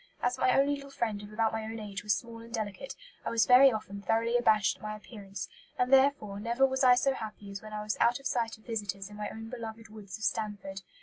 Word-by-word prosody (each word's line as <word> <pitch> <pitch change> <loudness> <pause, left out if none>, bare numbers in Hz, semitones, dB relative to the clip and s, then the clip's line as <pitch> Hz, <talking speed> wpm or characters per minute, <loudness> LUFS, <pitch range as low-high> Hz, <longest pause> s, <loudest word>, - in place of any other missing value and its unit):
As 245 0 +1
my 255 - +4
only 280 +1 +3
little 280 -1 -6
friend 220 -6 -2
of 205 0 -10
about 220 +1 +1
my 220 0 -2
own 220 +1 -5
age 200 -3 -5
was 210 +1 +2
small 230 -1 -7
and 230 0 -12
delicate, 220 +1 -4 0.3
I - - -2
was 230 -1 +3
very 260 +2 +8
often 200 -2 -5
thoroughly 225 +3 +1
abashed 215 -4 +3
at - - -25
my 215 0 -4
appearance; 200 -3 -8 0.3
and 250 +2 +2
therefore 265 -7 +4
never 235 +5 +2
was 265 0 0
I 250 -1 +8
so 270 +2 +2
happy 210 -4 -7
as 195 - -6
when 215 - -10
I 210 0 -4
was 215 0 -2
out 240 +3 +4
of 275 - -17
sight 230 -4 0
of 215 - -24
visitors 205 -3 -4
in - - -10
my 210 0 -4
own 225 0 -8
beloved 225 -2 -7
woods 205 -2 -9
of 220 - -10
Stanford. 200 -4 -2
220 Hz, 250 wpm, -30 LUFS, 210-245 Hz, 0.3 s, very